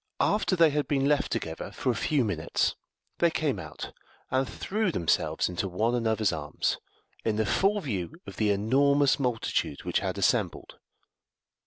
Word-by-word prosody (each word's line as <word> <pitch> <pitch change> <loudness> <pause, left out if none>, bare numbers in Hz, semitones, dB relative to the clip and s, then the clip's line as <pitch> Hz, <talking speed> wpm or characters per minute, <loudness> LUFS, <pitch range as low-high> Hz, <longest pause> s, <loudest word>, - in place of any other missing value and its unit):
After 210 -2 +2
they 165 -3 +5
had 150 0 0
been 135 -2 +1
left 145 0 +2
together 80 0 -3
for 130 - -1
a - - -3
few 135 +3 +1
minutes 100 - 0 0.4
they 170 - +5
came 150 -9 -1
out, 80 -4 -8 0.4
and 130 -1 +1
threw 200 - -1
themselves 85 - +1
into 90 +2 -2
one 110 +6 0
another's 110 -5 +1
arms, 75 -2 -2 0.4
in 110 - 0
the 110 0 +1
full 195 - +2
view 110 - -3
of - - -10
the 105 -1 +2
enormous 140 +8 +3
multitude 120 - -1
which - - 0
had - - -3
assembled. - - 0
125 Hz, 160 wpm, -28 LUFS, 105-145 Hz, 0.4 s, they